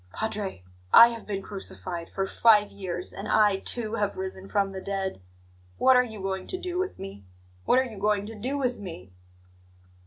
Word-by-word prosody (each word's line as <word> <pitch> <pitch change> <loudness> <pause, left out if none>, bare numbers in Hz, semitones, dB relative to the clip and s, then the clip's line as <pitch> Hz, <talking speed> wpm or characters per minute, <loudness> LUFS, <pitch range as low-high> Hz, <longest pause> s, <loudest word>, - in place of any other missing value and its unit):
Padre, 205 - -3 0.3
I 235 - +10
have 230 -2 -8
been 195 -2 -3
crucified 180 -3 -6
for 195 - -2
five 210 0 +4
years, 185 -2 -5
and 200 - -6
I, 210 -3 +4
too, 220 +2 -3
have 205 -1 -1
risen 190 0 -6
from 200 -1 +1
the 190 -1 -6
dead. 195 - -3 0.6
What 260 - +5
are 250 - +7
you 220 -4 -8
going 190 -1 -3
to 370 - -3
do 360 -1 -3
with 375 0 -2
me? 100 +1 -8 0.4
What - - +4
are 260 - +4
you 220 -5 -9
going 205 0 +1
to 220 - -7
do 255 +7 -2
with 250 -3 -1
me?" 95 - -9
205 Hz, 190 wpm, -27 LUFS, 190-230 Hz, 0.6 s, I